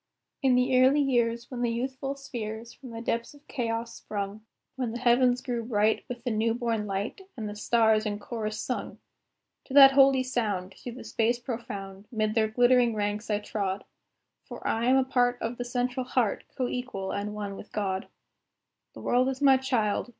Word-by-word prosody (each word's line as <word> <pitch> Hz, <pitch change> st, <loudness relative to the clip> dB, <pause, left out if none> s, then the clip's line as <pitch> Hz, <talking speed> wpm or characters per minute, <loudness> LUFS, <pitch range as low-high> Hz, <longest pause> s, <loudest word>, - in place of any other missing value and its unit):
In 265 Hz, -3 st, +4 dB
the 255 Hz, 0 st, +4 dB
early 265 Hz, +3 st, +5 dB
years, 235 Hz, -4 st, +1 dB
when 245 Hz, -1 st, -4 dB
the 240 Hz, -, +2 dB
youthful 260 Hz, +3 st, -3 dB
spheres, 230 Hz, -4 st, -6 dB
From 260 Hz, -, -12 dB
the 230 Hz, 0 st, -7 dB
depths 235 Hz, +4 st, -2 dB
of 290 Hz, +1 st, -20 dB
Chaos 230 Hz, -2 st, -2 dB
sprung, 205 Hz, 0 st, -5 dB, 0.3 s
When 250 Hz, -4 st, -2 dB
the -, -, -3 dB
heavens 245 Hz, 0 st, +3 dB
grew 240 Hz, -3 st, -2 dB
bright 220 Hz, -2 st, +1 dB
with 240 Hz, -1 st, -6 dB
the 245 Hz, -, -1 dB
new 225 Hz, +1 st, +1 dB
born 230 Hz, -3 st, -1 dB
light, 200 Hz, -, -3 dB, 0.2 s
And 220 Hz, -2 st, -4 dB
the 205 Hz, -, -6 dB
stars 220 Hz, 0 st, +3 dB
in 205 Hz, -1 st, -2 dB
chorus 215 Hz, 0 st, -4 dB
sung 250 Hz, -, -4 dB, 0.7 s
To 270 Hz, -, -7 dB
that 275 Hz, -1 st, +10 dB
holy 270 Hz, -1 st, +5 dB
sound, 210 Hz, -8 st, -2 dB
through 240 Hz, +4 st, -8 dB
the 250 Hz, -, -9 dB
space 235 Hz, +1 st, +1 dB
profound, 205 Hz, -5 st, -6 dB
'Mid 215 Hz, -2 st, 0 dB
their 220 Hz, -1 st, +3 dB
glittering 245 Hz, +1 st, +4 dB
ranks 210 Hz, +1 st, -2 dB
I 210 Hz, -, +2 dB
trod; 200 Hz, -2 st, -3 dB, 0.6 s
For -, -, -7 dB
I 225 Hz, +1 st, 0 dB
am 260 Hz, +1 st, +5 dB
a 265 Hz, -, +4 dB
part 245 Hz, -1 st, +2 dB
of 230 Hz, +2 st, -4 dB
the 245 Hz, -, -2 dB
Central 250 Hz, +1 st, -1 dB
Heart, 245 Hz, -5 st, 0 dB
Co 255 Hz, -, 0 dB
equal 245 Hz, -7 st, -4 dB
and 205 Hz, +1 st, -3 dB
one 205 Hz, -1 st, -4 dB
with 205 Hz, -, -11 dB
God. 195 Hz, -2 st, -2 dB, 0.9 s
The -, -, -9 dB
world 250 Hz, +2 st, +2 dB
is 265 Hz, -, -4 dB
my 275 Hz, -2 st, +6 dB
child. 245 Hz, -4 st, 0 dB
235 Hz, 190 wpm, -28 LUFS, 215-255 Hz, 0.9 s, that